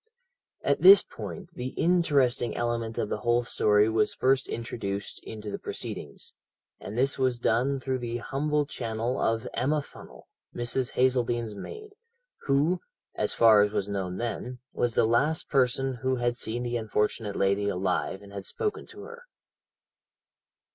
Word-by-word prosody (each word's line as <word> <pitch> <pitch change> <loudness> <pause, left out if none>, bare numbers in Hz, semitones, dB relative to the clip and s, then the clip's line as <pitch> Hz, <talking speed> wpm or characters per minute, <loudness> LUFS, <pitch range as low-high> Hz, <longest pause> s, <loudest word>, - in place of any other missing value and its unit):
"At - - +1
this 395 +2 +10
point 185 -4 -8
the 125 -2 -5
interesting 145 -9 +2
element 115 -1 -2
of 105 - -1
the - - -2
whole 120 +1 +2
story 105 -2 +3
was 110 -1 +1
first 130 0 +2
introduced 100 -4 -4
into 105 -2 -7
the - - -4
proceedings, 70 - -6 0.5
and 105 - -7
this 135 +2 +1
was 130 -2 +2
done 125 +4 +1
through 130 -1 -2
the 120 -1 -3
humble 145 +4 -1
channel 115 -1 -3
of 115 0 0
Emma 145 +3 0
Funnel, - - -14 0.3
Mrs. 120 +1 -2
Hazeldene's 120 -3 +1
maid, 425 - -9 0.5
who, 150 +6 +2 0.3
as - - -1
far 110 -3 +7
as 105 0 +2
was 100 - -1
known 95 -3 -3
then, 120 +1 -4 0.2
was 120 -2 0
the - - +4
last 145 +8 +1
person 135 -1 +2
who 130 +1 0
had 120 -1 0
seen 120 +1 -3
the 120 0 -1
unfortunate 105 -1 -1
lady 100 +1 +1
alive 95 +1 -1
and 100 0 -13
had 100 -1 -5
spoken 425 - -3
to - - -11
her. 475 +1 -11
120 Hz, 155 wpm, -28 LUFS, 110-135 Hz, 0.5 s, this